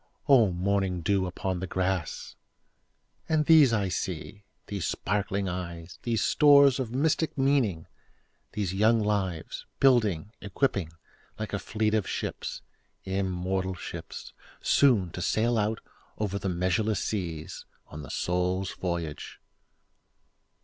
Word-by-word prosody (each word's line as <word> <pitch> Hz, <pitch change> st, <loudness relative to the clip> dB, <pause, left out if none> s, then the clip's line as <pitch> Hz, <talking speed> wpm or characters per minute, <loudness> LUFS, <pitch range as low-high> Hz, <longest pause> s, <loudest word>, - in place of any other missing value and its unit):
O 120 Hz, -9 st, +6 dB
morning 95 Hz, 0 st, 0 dB
dew 95 Hz, +2 st, +1 dB
upon 90 Hz, +1 st, -3 dB
the 95 Hz, -, -4 dB
grass! 95 Hz, -2 st, -2 dB, 0.9 s
And 155 Hz, -1 st, +2 dB
these 155 Hz, -5 st, +7 dB
I 100 Hz, -4 st, +1 dB
see—these 95 Hz, +2 st, -5 dB
sparkling 100 Hz, 0 st, -1 dB
eyes, 85 Hz, -2 st, -6 dB
These 115 Hz, -2 st, 0 dB
stores 140 Hz, -3 st, +6 dB
of 130 Hz, -4 st, -2 dB
mystic 150 Hz, +5 st, 0 dB
meaning—these 105 Hz, -, -2 dB
young 110 Hz, +4 st, +4 dB
lives, 100 Hz, -6 st, -2 dB
Building, 110 Hz, -8 st, +3 dB
equipping, 100 Hz, -, -1 dB, 0.4 s
like 110 Hz, -1 st, -5 dB
a 100 Hz, -, 0 dB
fleet 110 Hz, +1 st, -1 dB
of 110 Hz, -3 st, 0 dB
ships—immortal 95 Hz, 0 st, -4 dB
ships! -, -, -8 dB, 0.3 s
Soon 110 Hz, -11 st, +3 dB
to 90 Hz, -, -6 dB
sail 110 Hz, +7 st, +1 dB
out 110 Hz, 0 st, 0 dB, 0.4 s
over 100 Hz, -2 st, -2 dB
the 100 Hz, -, -2 dB
measureless 95 Hz, +4 st, 0 dB
seas, 85 Hz, -4 st, -4 dB, 0.2 s
On 75 Hz, -, -9 dB
the 70 Hz, -, -10 dB
Soul's 90 Hz, +2 st, -1 dB
voyage. 85 Hz, -5 st, -4 dB
100 Hz, 115 wpm, -28 LUFS, 90-110 Hz, 0.9 s, these